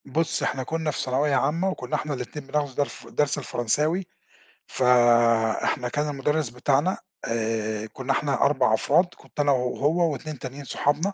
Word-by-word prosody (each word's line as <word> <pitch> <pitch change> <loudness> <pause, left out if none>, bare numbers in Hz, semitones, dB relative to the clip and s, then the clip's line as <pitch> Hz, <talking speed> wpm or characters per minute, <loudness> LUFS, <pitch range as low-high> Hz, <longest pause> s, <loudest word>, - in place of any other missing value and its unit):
بُصّي 155 +1 -1
إحنا 130 0 -1
كنا 160 +2 -2
في - - -5
ثانوية 135 +3 +1
عامة، 170 +5 +1
وكنا 130 -9 -3
إحنا 150 -1 -2
الاتنين 135 +2 -6
بناخدوا 145 -1 -1
درف 145 - -3
درس 145 -1 0
الفرنساوي، 150 - 0 0.6
فإحنا 120 -1 +3
كان 150 +3 -1
المدرس 145 0 0
بتاعنا 140 +8 +1 0.3
آآ، 110 -2 -1
كنا 130 +1 -2
إحنا 140 0 0
4 140 -5 +3
أفراد، 150 +10 +3
كنت - - -15
أنا 145 -1 +4
وهو 145 +6 +1
و2 145 +1 -7
تانيين 135 +2 -7
صحابنا، 150 +9 0
140 Hz, 150 wpm, -25 LUFS, 125-150 Hz, 0.6 s, أنا